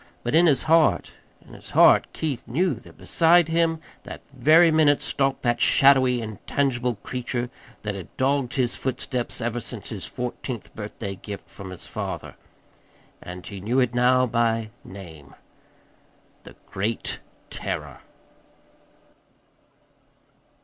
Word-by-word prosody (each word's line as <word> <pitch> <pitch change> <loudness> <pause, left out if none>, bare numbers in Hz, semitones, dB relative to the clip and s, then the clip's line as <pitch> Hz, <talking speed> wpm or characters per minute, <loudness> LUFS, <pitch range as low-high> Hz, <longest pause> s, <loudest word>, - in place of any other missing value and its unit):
But 120 - -2
in 170 +2 +6
his 145 -4 +3
heart 160 0 +3 0.4
in - - -14
his - - -12
heart - - +6
Keith 145 -8 -4
knew 165 +8 +1
that 115 - -13
beside 170 0 +4
him 165 0 +1 0.2
that - - -9
very 155 +6 +5
minute 155 -2 +4
stalked 135 -1 -1
that 120 -2 +1
shadowy, 130 -3 +5
intangible 120 +3 -1
creature 125 -1 -3 0.3
that 105 -1 -2
had 95 -3 -10
dogged 135 -1 0
his 125 -3 0
footsteps 130 -1 -3
ever 120 +1 -2
since 120 -3 -8
his 100 -4 -5
fourteenth 125 -2 -6
birthday 105 -1 -6
gift 100 +1 -9
from 95 -1 -10
his 95 -2 -9
father; - - -5 0.9
and 90 0 -9
he 100 -3 -8
knew 120 +7 +1
it 125 -2 +1
now 125 +1 +4
by 115 -2 0
name 80 -8 -12 1.1
The - - -12
Great 105 +4 -3 0.3
Terror. - - -5
125 Hz, 130 wpm, -24 LUFS, 110-140 Hz, 1.1 s, in